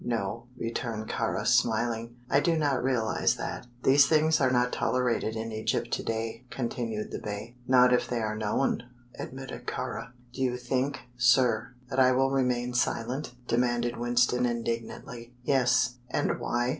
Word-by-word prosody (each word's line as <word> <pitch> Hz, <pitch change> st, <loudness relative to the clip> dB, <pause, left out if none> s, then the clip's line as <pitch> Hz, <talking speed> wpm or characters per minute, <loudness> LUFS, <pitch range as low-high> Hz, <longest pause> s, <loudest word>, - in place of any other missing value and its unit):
"No," 115 Hz, 0 st, -2 dB
returned 115 Hz, -1 st, -3 dB
Kāra, -, -, -1 dB
smiling; 115 Hz, +1 st, +1 dB
"I 140 Hz, -, +4 dB
do 165 Hz, +2 st, +2 dB
not 145 Hz, -5 st, +1 dB
realize 120 Hz, -4 st, +1 dB
that." -, -, -5 dB, 0.2 s
"These 140 Hz, +1 st, +6 dB
things 155 Hz, 0 st, +3 dB
are 130 Hz, -, +4 dB
not 125 Hz, -1 st, +2 dB
tolerated 125 Hz, -3 st, 0 dB
in 115 Hz, 0 st, -4 dB
Egypt 110 Hz, 0 st, -1 dB
to -, -, 0 dB
day," 115 Hz, +1 st, -3 dB
continued 115 Hz, -4 st, -3 dB
the -, -, -4 dB
Bey. 105 Hz, +2 st, -6 dB
"Not 125 Hz, -1 st, +6 dB
if 125 Hz, -, +2 dB
they 120 Hz, -, -1 dB
are 110 Hz, -1 st, -1 dB
known," 110 Hz, +5 st, 0 dB, 0.4 s
admitted 130 Hz, -2 st, -7 dB
Kāra. 125 Hz, -1 st, -4 dB, 0.2 s
"Do 130 Hz, -, -6 dB
you 125 Hz, -1 st, +1 dB
think, 130 Hz, +2 st, -1 dB, 0.2 s
sir, 125 Hz, -1 st, +3 dB, 0.2 s
that 130 Hz, -, 0 dB
I 130 Hz, 0 st, +6 dB
will 135 Hz, +1 st, +2 dB
remain 125 Hz, -2 st, 0 dB
silent?" 125 Hz, +2 st, -1 dB
demanded 120 Hz, 0 st, +1 dB
Winston, 120 Hz, +1 st, +2 dB
indignantly. 120 Hz, +1 st, -4 dB
"Yes." 125 Hz, -2 st, +2 dB
"And -, -, 0 dB
why?" 120 Hz, +1 st, 0 dB
125 Hz, 155 wpm, -28 LUFS, 115-130 Hz, 0.4 s, These